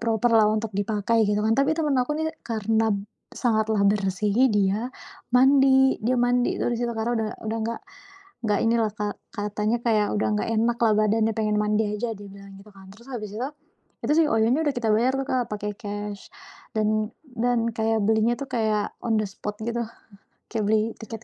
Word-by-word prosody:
proper-lah 225 Hz, -1 st, +3 dB
untuk 215 Hz, 0 st, -2 dB
dipakai 215 Hz, +2 st, +1 dB
gitu 205 Hz, 0 st, +1 dB
kan. 220 Hz, +1 st, +2 dB
Tapi 280 Hz, +3 st, +3 dB
temen 305 Hz, -4 st, 0 dB
aku 250 Hz, +4 st, 0 dB
nih 315 Hz, -, 0 dB, 0.2 s
karena 220 Hz, -1 st, +1 dB, 0.4 s
sangatlah 220 Hz, -3 st, +1 dB
bersih 200 Hz, 0 st, 0 dB, 0.2 s
dia 205 Hz, +5 st, 0 dB, 0.4 s
mandi 265 Hz, +1 st, +5 dB
dia 245 Hz, +1 st, +2 dB
mandi 245 Hz, 0 st, +1 dB
tuh -, -, +1 dB
di 240 Hz, -, -1 dB
situ. 240 Hz, 0 st, -2 dB
Karena 225 Hz, +2 st, -1 dB
udah 220 Hz, -1 st, -1 dB, 0.2 s
udah 225 Hz, +1 st, -2 dB
enggak 230 Hz, +1 st, -3 dB, 0.6 s
enggak 210 Hz, -2 st, +1 dB
inilah 230 Hz, -1 st, +2 dB, 0.4 s
katanya 210 Hz, +2 st, -1 dB
kayak, 220 Hz, -3 st, +2 dB
udah 205 Hz, -, +1 dB
enggak 210 Hz, -, -2 dB
enak 230 Hz, +2 st, +1 dB
lah 220 Hz, -, +4 dB
badannya 215 Hz, +1 st, +2 dB
pengen 215 Hz, -1 st, 0 dB
mandi 210 Hz, +1 st, +1 dB
aja 230 Hz, +2 st, -2 dB
dia 205 Hz, -1 st, -10 dB
bilang 200 Hz, 0 st, -13 dB
gitu 210 Hz, -, -16 dB
kan. 190 Hz, -1 st, -15 dB
Terus 235 Hz, +6 st, -17 dB
habis 215 Hz, -6 st, -6 dB
itu, 255 Hz, +4 st, -2 dB, 0.6 s
itu -, -, +2 dB
sih 320 Hz, -, +4 dB
OYO-nya 235 Hz, +3 st, +2 dB
udah 285 Hz, -, +1 dB
kita 235 Hz, -2 st, -1 dB
bayar 250 Hz, +5 st, +2 dB
tuh 270 Hz, -, -1 dB
Kak, 250 Hz, -2 st, 0 dB
pake 210 Hz, 0 st, -3 dB
cash 205 Hz, -1 st, -6 dB, 0.5 s
dan 215 Hz, 0 st, +1 dB, 0.3 s
dan 235 Hz, 0 st, +1 dB
kayak 220 Hz, -1 st, 0 dB
belinya 220 Hz, +2 st, +2 dB
itu 280 Hz, -, -5 dB
kayak 215 Hz, -4 st, 0 dB
on 225 Hz, -2 st, +1 dB
the -, -, -1 dB
spot 205 Hz, +1 st, -6 dB
gitu, 235 Hz, +1 st, -2 dB, 0.7 s
kayak 220 Hz, -2 st, -1 dB
beli 220 Hz, +1 st, +2 dB
tiket 225 Hz, 0 st, -8 dB
220 Hz, 185 wpm, -25 LUFS, 210-240 Hz, 0.7 s, mandi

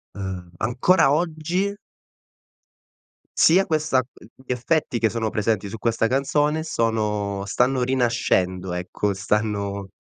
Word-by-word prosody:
ehm, 95 Hz, -3 st, -6 dB
ancora 125 Hz, -, +3 dB
oggi 175 Hz, +5 st, -1 dB, 1.6 s
sia 185 Hz, +4 st, +5 dB
questa 155 Hz, -3 st, +1 dB
uhm, 125 Hz, -3 st, -9 dB, 0.2 s
gli -, -, -3 dB
effetti 125 Hz, +2 st, 0 dB
che 115 Hz, -1 st, +2 dB
sono 115 Hz, 0 st, -2 dB
presenti 105 Hz, -2 st, -1 dB
su 115 Hz, -, -6 dB
questa 115 Hz, +1 st, +1 dB
canzone 145 Hz, +4 st, +1 dB
sono 105 Hz, -8 st, -1 dB
stanno 125 Hz, +5 st, +1 dB
rinascendo, 115 Hz, -8 st, 0 dB
ecco, 90 Hz, +3 st, -2 dB
stanno 100 Hz, 0 st, -2 dB
115 Hz, 115 wpm, -23 LUFS, 100-145 Hz, 1.6 s, sia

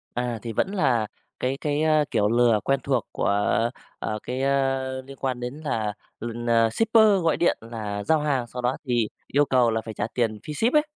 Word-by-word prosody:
À, 120 Hz, -2 st, -2 dB
thì 115 Hz, -, -5 dB
vẫn 190 Hz, -, 0 dB
là 120 Hz, -, +1 dB, 0.3 s
cái 130 Hz, +2 st, -1 dB
cái, 150 Hz, 0 st, 0 dB
a, 155 Hz, -1 st, +4 dB
kiểu 105 Hz, -, +2 dB
lừa 120 Hz, -1 st, +4 dB
quen 135 Hz, 0 st, +1 dB
thuộc 130 Hz, -4 st, 0 dB
của, -, -, -1 dB, 0.7 s
ờ, 110 Hz, -, -3 dB
cái, 130 Hz, +1 st, -3 dB
ơ, 135 Hz, -1 st, 0 dB
liên 135 Hz, +1 st, -12 dB
quan 130 Hz, -2 st, -2 dB
đến 125 Hz, +2 st, -4 dB
là 110 Hz, -6 st, -1 dB, 0.3 s
l 120 Hz, +1 st, -4 dB
à, 115 Hz, -1 st, +4 dB
shipper 220 Hz, -, +4 dB
gọi 165 Hz, -, +2 dB
điện 170 Hz, -, +2 dB
là 110 Hz, -3 st, -5 dB
giao 160 Hz, +8 st, +3 dB
hàng 140 Hz, -5 st, 0 dB
sau 125 Hz, +1 st, -6 dB
đó 125 Hz, +2 st, 0 dB
thì 120 Hz, -3 st, +2 dB, 0.2 s
yêu 145 Hz, +1 st, +3 dB
cầu 125 Hz, -3 st, +3 dB
là 110 Hz, 0 st, 0 dB
phải 110 Hz, 0 st, -7 dB
trả 105 Hz, -, -2 dB
tiền 115 Hz, -3 st, 0 dB
phí 150 Hz, -, -5 dB
ship 230 Hz, -, +1 dB
ấy. 300 Hz, -, +5 dB
125 Hz, 215 wpm, -25 LUFS, 115-145 Hz, 0.7 s, ấy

